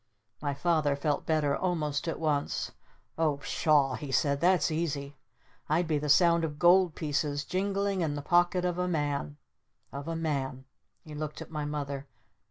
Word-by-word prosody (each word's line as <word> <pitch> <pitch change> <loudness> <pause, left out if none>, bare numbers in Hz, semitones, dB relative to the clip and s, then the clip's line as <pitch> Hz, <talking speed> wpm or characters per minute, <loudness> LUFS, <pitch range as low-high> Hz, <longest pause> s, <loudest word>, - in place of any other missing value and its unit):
My 145 -1 -2
Father 155 -2 +1
felt 145 0 -1
better 150 -3 +2
almost 160 -3 -1
at 165 - -2
once. 150 -3 -1 0.5
"Oh 155 -3 +2
Pshaw!" 140 -1 +2
he 140 +1 -5
said. 140 +1 +1
"That's 175 -2 +3
easy. 145 -3 -2 0.5
I'd 165 +3 +2
be 155 -2 +1
the 150 0 -3
Sound 170 +2 +5
of 150 -2 -3
Gold 175 0 +5
Pieces 145 -1 -1
jingling 195 0 -1
in 150 -3 0
the 145 - -5
pocket 175 +2 +3
of 180 0 -1
a 180 - 0
man 145 - -2 0.5
of 140 +3 -7
a 165 - -2
man 135 -5 -2 0.2
" - - -48
He 155 - -9
looked 150 0 -5
at - - -9
my 150 -2 -3
Mother. 140 -2 -4
150 Hz, 175 wpm, -29 LUFS, 145-170 Hz, 0.5 s, Sound